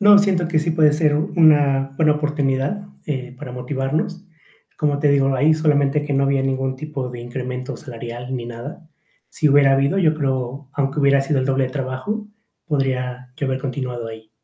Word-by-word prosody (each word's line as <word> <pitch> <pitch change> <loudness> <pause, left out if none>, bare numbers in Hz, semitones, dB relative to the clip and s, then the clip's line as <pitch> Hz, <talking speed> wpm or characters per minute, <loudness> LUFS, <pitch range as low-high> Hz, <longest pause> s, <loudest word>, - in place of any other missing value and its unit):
No, 205 0 +8
siento 190 -4 +2
que 160 -2 +1
sí 165 +1 0
puede 155 -2 +4
ser 150 -1 +2
una 145 -5 +3
buena 155 -2 +4
oportunidad, 150 +5 -1 0.2
eh, 130 -4 -4
para 130 -1 -8
motivarnos. 140 +9 -3 0.5
Como 145 -1 0
te 150 - +3
digo, 135 -1 +3
ahí 150 +5 +4
solamente 150 -2 +2
que 145 - -3
no 135 - +2
había 135 -1 +2
ningún 135 0 -1
tipo 135 -3 -5
de 120 -1 -8
incremento 125 +2 -5
salarial 120 -1 -7
ni 120 -1 -5
nada. 140 +8 -9 0.4
Sí 155 - +1
hubiera 140 -1 +5
habido, 140 +8 +2
yo 160 -4 +3
creo, 135 -1 -3
aunque 140 +1 -1
hubiera 140 -1 +4
sido 135 -1 0
el 130 - -1
doble 135 0 +2
de 130 - -4
trabajo, 140 +12 -4 0.4
podría 125 -4 -2
yo 140 - -2
haber 130 0 -1
continuado 130 -4 -4
ahí. 110 -1 -10
140 Hz, 185 wpm, -21 LUFS, 130-150 Hz, 0.5 s, No